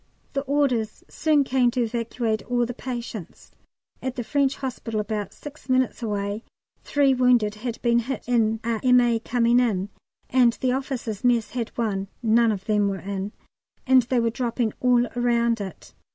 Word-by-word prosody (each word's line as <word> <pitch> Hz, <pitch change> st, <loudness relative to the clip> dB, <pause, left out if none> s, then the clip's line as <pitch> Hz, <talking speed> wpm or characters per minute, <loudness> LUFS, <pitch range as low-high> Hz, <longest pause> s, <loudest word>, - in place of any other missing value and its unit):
The 275 Hz, -, 0 dB
orders 260 Hz, -6 st, 0 dB
soon 305 Hz, -3 st, +2 dB
came 255 Hz, -2 st, +2 dB
to 245 Hz, 0 st, 0 dB
evacuate 230 Hz, -1 st, -2 dB
all 245 Hz, -1 st, +2 dB
the 245 Hz, -, -5 dB
patients. 235 Hz, -7 st, -7 dB, 0.5 s
At 260 Hz, -1 st, -3 dB
the 245 Hz, -, -3 dB
French 275 Hz, +3 st, +1 dB
Hospital, 240 Hz, -4 st, -4 dB
about 210 Hz, -1 st, -3 dB
six 295 Hz, -2 st, -12 dB
minutes 255 Hz, -1 st, +1 dB
away, 205 Hz, 0 st, -2 dB, 0.4 s
three 280 Hz, -2 st, +3 dB
wounded 250 Hz, -4 st, +3 dB
had 230 Hz, +2 st, -5 dB
been 235 Hz, -1 st, +4 dB
hit 255 Hz, +3 st, -4 dB
in 225 Hz, -2 st, +2 dB
a 230 Hz, -1 st, -1 dB
M.A. 245 Hz, -2 st, +4 dB
coming 235 Hz, +1 st, +2 dB
in, 205 Hz, -6 st, 0 dB, 0.4 s
and 245 Hz, -2 st, +4 dB
the 255 Hz, +2 st, -1 dB
Officers' 255 Hz, -5 st, -3 dB
Mess 240 Hz, -3 st, +2 dB
had 235 Hz, -3 st, -3 dB
one 200 Hz, -4 st, -1 dB, 0.2 s
(none 230 Hz, 0 st, +4 dB
of 195 Hz, -2 st, -4 dB
them 210 Hz, -2 st, +2 dB
were 195 Hz, -1 st, -1 dB
in), 195 Hz, +1 st, -4 dB, 0.5 s
and 260 Hz, 0 st, +6 dB
they 245 Hz, +1 st, 0 dB
were 230 Hz, -1 st, +1 dB
dropping 235 Hz, -2 st, -1 dB
all 245 Hz, -1 st, +4 dB
round 235 Hz, -2 st, +1 dB
it. 190 Hz, -3 st, -8 dB
235 Hz, 165 wpm, -24 LUFS, 220-255 Hz, 0.5 s, and